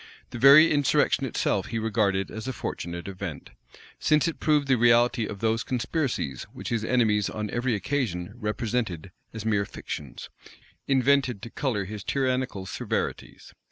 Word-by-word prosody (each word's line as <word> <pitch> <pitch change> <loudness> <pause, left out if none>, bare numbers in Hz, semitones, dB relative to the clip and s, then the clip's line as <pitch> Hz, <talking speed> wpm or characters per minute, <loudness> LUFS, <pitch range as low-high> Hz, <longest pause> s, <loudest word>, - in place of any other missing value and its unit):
The 120 - -6
very 140 +5 +8
insurrection 145 -1 +2
itself 100 -4 -1
he 115 - -3
regarded 100 -3 0
as 110 +3 -6
a 130 - -2
fortunate 85 -5 -5
event; 95 -5 -7 0.5
since 150 0 +3
it 165 - -4
proved 150 -2 +2
the 135 - +4
reality 120 0 +3
of 100 - -8
those 115 0 +1
conspiracies 125 - -2
which - - -7
his 115 -2 -1
enemies 110 -4 +2
on 105 -1 -4
every 120 0 0
occasion 105 -5 -2
represented 105 -5 -2 0.2
as 110 -1 -7
mere 105 -2 +2
fictions, 70 -7 -8 0.6
invented 135 -4 +2
to 115 - -7
color 115 -8 -1
his 105 0 -7
tyrannical 130 -7 -1
severities. 90 - -4
115 Hz, 150 wpm, -26 LUFS, 100-130 Hz, 0.6 s, very